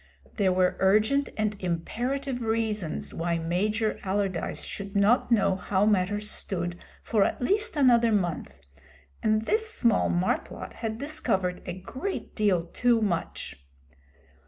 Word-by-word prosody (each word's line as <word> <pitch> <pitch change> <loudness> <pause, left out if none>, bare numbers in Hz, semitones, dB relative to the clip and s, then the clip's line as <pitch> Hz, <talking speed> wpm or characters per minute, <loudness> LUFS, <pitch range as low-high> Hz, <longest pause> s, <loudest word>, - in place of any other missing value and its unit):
There 195 -4 +3
were 185 0 +2
urgent 215 +9 +3
and 215 -1 0
imperative 245 - -2
reasons 220 -6 -1
why 170 0 -1
Major 210 +7 0
Allardyce 190 -3 -2
should 200 0 -6
not 210 +5 +3
know 195 -4 +3
how 190 +1 0
matters 205 0 +1
stood 175 -2 -3 0.2
for 215 -4 +2
at - - -1
least 415 - +1
another 240 -4 +5
month, 175 - -2 0.6
and 215 0 +2
this 440 - +1
small 235 - +2
marplot 175 +2 -2
had 220 -1 -4
discovered 220 -11 -1
a 175 - -3
great 260 - -5
deal 195 -6 +2
too 240 +6 +2
much. 170 - -3
210 Hz, 130 wpm, -27 LUFS, 185-235 Hz, 0.6 s, another